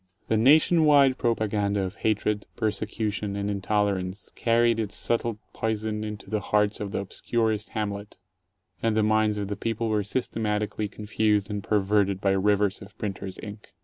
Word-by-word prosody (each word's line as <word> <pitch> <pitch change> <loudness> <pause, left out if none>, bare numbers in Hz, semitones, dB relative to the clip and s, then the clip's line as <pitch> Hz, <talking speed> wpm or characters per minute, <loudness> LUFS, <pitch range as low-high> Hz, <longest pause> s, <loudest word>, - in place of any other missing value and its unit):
The 110 - +3
nation 155 +8 +5
wide 140 -3 +5
propaganda 105 -4 0
of 95 +2 -5
hatred, 105 -1 0
persecution, 105 -1 -2
and 100 0 -2
intolerance 100 -1 -1
carried 115 0 +2
its 105 -3 -2
subtle 115 -2 -1 0.2
poison 110 -1 -2
into 105 -1 -6
the 110 - -1
hearts 105 +1 +1
of 105 - -3
the 100 - -2
obscurest 110 +2 -1
hamlet, 100 -1 -4 0.6
and 115 -1 +1
the 110 - +3
minds 110 0 +2
of 100 -1 -2
the 100 - -3
people 115 +1 -2
were 105 -1 +1
systematically 105 -1 -2
confused 105 0 0
and 105 -1 -3
perverted 100 -2 +2
by 100 -1 +2
rivers 100 +1 +2
of 100 0 -13
printer's 95 -2 -5
ink. 105 -2 -10
105 Hz, 155 wpm, -26 LUFS, 100-110 Hz, 0.6 s, nation